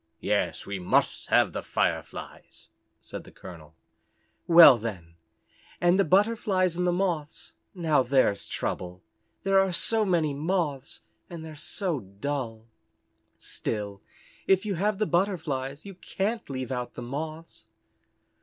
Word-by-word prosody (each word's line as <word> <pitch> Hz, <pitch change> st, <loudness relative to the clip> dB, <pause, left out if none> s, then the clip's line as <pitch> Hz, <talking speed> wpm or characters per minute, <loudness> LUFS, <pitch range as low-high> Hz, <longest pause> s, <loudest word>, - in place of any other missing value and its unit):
"Yes, -, -, -1 dB
we 100 Hz, -1 st, -4 dB
must 90 Hz, -, +1 dB
have -, -, +3 dB
the -, -, -3 dB
Fireflies," -, -, -3 dB, 0.3 s
said -, -, -8 dB
the -, -, -14 dB
colonel. 80 Hz, -3 st, -12 dB, 0.7 s
"Well, 165 Hz, -8 st, +9 dB
then 95 Hz, -7 st, -6 dB, 0.7 s
and 175 Hz, +2 st, +3 dB
the -, -, +6 dB
Butterflies 195 Hz, -1 st, +2 dB
and 180 Hz, +1 st, 0 dB
the -, -, +3 dB
Moths, 175 Hz, -5 st, -2 dB, 0.2 s
now 160 Hz, -6 st, +2 dB
there's 130 Hz, -6 st, +2 dB
the -, -, -15 dB
trouble. 90 Hz, 0 st, -4 dB, 0.4 s
There 195 Hz, 0 st, +4 dB
are 195 Hz, -1 st, +2 dB
so 215 Hz, +6 st, +1 dB
many 170 Hz, -7 st, +1 dB
Moths, 150 Hz, -3 st, -2 dB, 0.3 s
and 165 Hz, -2 st, -8 dB
they're 155 Hz, -1 st, -9 dB
so 170 Hz, +1 st, -1 dB
dull. 115 Hz, +2 st, -5 dB, 0.7 s
Still 100 Hz, -2 st, -4 dB, 0.5 s
if 190 Hz, +1 st, +3 dB
you 205 Hz, -, -1 dB
have 200 Hz, +3 st, 0 dB
the 215 Hz, -, +1 dB
Butterflies 155 Hz, -7 st, -1 dB
you 195 Hz, -, -8 dB
can't 205 Hz, +4 st, -3 dB
leave 130 Hz, -2 st, -4 dB
out 125 Hz, -1 st, -4 dB
the 120 Hz, -, -6 dB
Moths." 155 Hz, 0 st, -6 dB
160 Hz, 135 wpm, -27 LUFS, 125-185 Hz, 0.7 s, Well